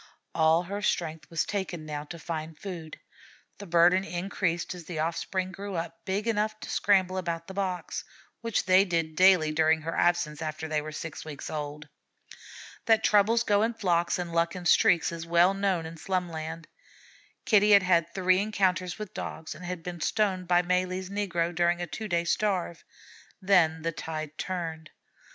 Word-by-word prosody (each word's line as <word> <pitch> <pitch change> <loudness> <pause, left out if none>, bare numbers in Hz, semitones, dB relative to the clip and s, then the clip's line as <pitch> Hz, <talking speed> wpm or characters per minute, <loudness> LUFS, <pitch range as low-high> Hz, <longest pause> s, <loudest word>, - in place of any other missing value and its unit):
All 160 +1 +3
her 200 +3 -5
strength 165 -4 -2
was 165 -2 0
taken 175 -6 -4
now 150 -1 -5
to 170 - -8
find 160 -1 -5
food. 170 -5 -8 0.6
The 200 - -8
burden 175 +2 +4
increased 175 -2 -2
as 175 -2 -10
the 170 -1 -6
offspring 185 +4 -2
grew 200 0 -6
up 165 0 -5
big 200 +4 -2
enough 215 -1 0
to - - -6
scramble 190 -2 +2
about 170 -2 -3
the 190 - -9
boxes, 185 -2 -3 0.4
which 230 -2 -1
they 185 +1 +6
did 165 -4 -1
daily 185 -3 +5
during 160 0 +3
her 165 +1 -3
absence 160 -3 +1
after 155 0 -4
they 155 -1 0
were 155 +1 -7
six 160 +1 -6
weeks 150 -3 -7
old. 150 -1 -5 1.0
That 225 -1 +4
troubles 215 +3 +4
go 205 -2 +2
in 225 +1 0
flocks 175 -6 +1
and 175 -1 -4
luck 170 +1 +1
in 180 -1 -7
streaks, 180 -3 +4
is 165 0 -6
well 170 +3 +4
known 195 -4 0
in 165 +1 -8
Slumland. 165 -2 -3 0.8
Kitty 210 -4 +5
had 200 -2 +7
had 170 -2 +2
three 185 -1 +3
encounters 190 -3 0
with 210 -3 -7
Dogs, 160 - -6
and 180 - -12
had 175 -1 -5
been 175 -1 -6
stoned 190 -3 0
by 175 0 +4
Malee's 185 +1 -1
negro 180 -4 -1
during 175 +1 +2
a 175 - -2
two 215 +6 -6
days' 170 -2 0
starve. 185 -5 -1 0.6
Then 170 -5 +3
the 165 - 0
tide 155 -1 -6
turned. 165 -4 -4
175 Hz, 175 wpm, -28 LUFS, 165-190 Hz, 1.0 s, had